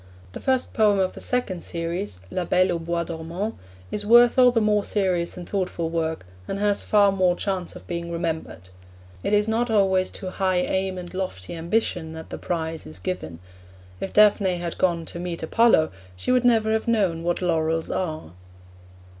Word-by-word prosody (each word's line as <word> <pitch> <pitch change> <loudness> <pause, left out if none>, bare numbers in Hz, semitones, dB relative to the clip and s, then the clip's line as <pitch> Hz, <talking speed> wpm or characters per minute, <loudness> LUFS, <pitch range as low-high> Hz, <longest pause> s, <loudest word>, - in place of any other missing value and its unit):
The - - -7
first 260 -1 0
poem 210 -2 +4
of 190 -1 +1
the - - -8
second 225 -8 -1
series, 170 - -4
La 185 - -1
Belle 185 +2 +2
au 170 - -1
Bois 170 +1 -2
Dormant, 170 +6 -4 0.4
is 210 - -3
worth 240 +3 +6
all 250 -1 +8
the 240 -2 +2
more 210 -1 +2
serious 185 -4 0
and 175 - -8
thoughtful 180 -4 -2
work, 160 - -2 0.2
and 195 - -3
has 205 0 +1
far 205 -2 +4
more 185 -2 +2
chance 185 -2 -3
of - - -11
being 170 -1 -4
remembered. 160 - -4 0.5
It - - -1
is 210 0 +3
not 230 +2 0
always 190 -3 +3
to 185 -2 -5
high 185 -1 0
aim 190 +1 -1
and 175 0 -8
lofty 185 - -4
ambition 170 -1 -1
that 160 0 -9
the - - -5
prize 165 -2 -3
is 80 +2 -9
given. 90 -3 -4 0.6
If - - -4
Daphne 205 -3 +4
had 170 -1 -5
gone 170 -3 +1
to 170 - -6
meet 175 -2 -4
Apollo, 160 -3 +4 0.2
she 90 - -2
would 250 -1 +3
never 225 -2 +4
have 220 +2 -1
known 195 -8 +1
what 175 +1 -1
laurels 165 -1 0
are. 155 - -3
180 Hz, 185 wpm, -24 LUFS, 165-205 Hz, 0.6 s, all